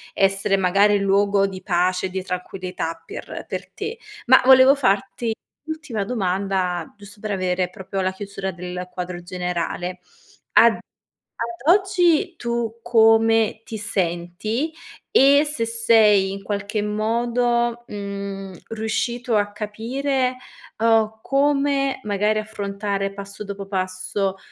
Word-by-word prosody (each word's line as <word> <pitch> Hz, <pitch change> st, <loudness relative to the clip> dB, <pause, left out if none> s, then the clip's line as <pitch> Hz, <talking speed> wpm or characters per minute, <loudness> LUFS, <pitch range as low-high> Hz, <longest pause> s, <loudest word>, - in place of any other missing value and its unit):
essere, 195 Hz, 0 st, +2 dB
magari, 200 Hz, +2 st, +4 dB
luogo 200 Hz, 0 st, +3 dB
di 190 Hz, -1 st, -5 dB
pace 185 Hz, 0 st, +1 dB
e -, -, -9 dB
di 190 Hz, 0 st, -4 dB
tranquillità 180 Hz, -2 st, -4 dB
per -, -, -7 dB
per -, -, -5 dB
te. 440 Hz, +3 st, -5 dB, 0.3 s
Ma 260 Hz, +2 st, +7 dB
volevo 260 Hz, +1 st, +8 dB
farti 225 Hz, -2 st, 0 dB, 0.3 s
ultima 315 Hz, -9 st, -4 dB
domanda, 190 Hz, -5 st, -1 dB
giusto 205 Hz, 0 st, -14 dB
per 215 Hz, -1 st, -3 dB
avere 185 Hz, -1 st, 0 dB
proprio 190 Hz, +1 st, -5 dB
la 185 Hz, 0 st, 0 dB
chiusura 195 Hz, 0 st, -5 dB
del 180 Hz, 0 st, -6 dB
quadro 180 Hz, -1 st, -5 dB
generale. 180 Hz, 0 st, -3 dB, 0.5 s
Ad -, -, +6 dB, 0.6 s
ad 235 Hz, +9 st, +2 dB
oggi, 360 Hz, -2 st, +2 dB
tu 235 Hz, -1 st, -3 dB
come 225 Hz, -1 st, +4 dB
ti 220 Hz, -, -6 dB
senti, 200 Hz, -, -2 dB, 0.4 s
e 280 Hz, +2 st, +6 dB
se 290 Hz, -6 st, -1 dB
sei, 220 Hz, -4 st, +4 dB
in 195 Hz, -, -6 dB
qualche 205 Hz, +1 st, -2 dB
modo, 235 Hz, +3 st, 0 dB
mhmm, 200 Hz, -1 st, -6 dB, 0.2 s
riuscito 225 Hz, +2 st, -1 dB
a 205 Hz, -1 st, +1 dB
capire, 250 Hz, +5 st, -2 dB, 0.4 s
uhm, 220 Hz, -1 st, +2 dB
come 275 Hz, 0 st, +1 dB
magari 210 Hz, +1 st, +1 dB
affrontare, 200 Hz, -2 st, -3 dB
passo 200 Hz, +1 st, -8 dB
dopo 200 Hz, -1 st, -7 dB
passo, 190 Hz, 0 st, -2 dB
205 Hz, 120 wpm, -22 LUFS, 190-235 Hz, 0.6 s, volevo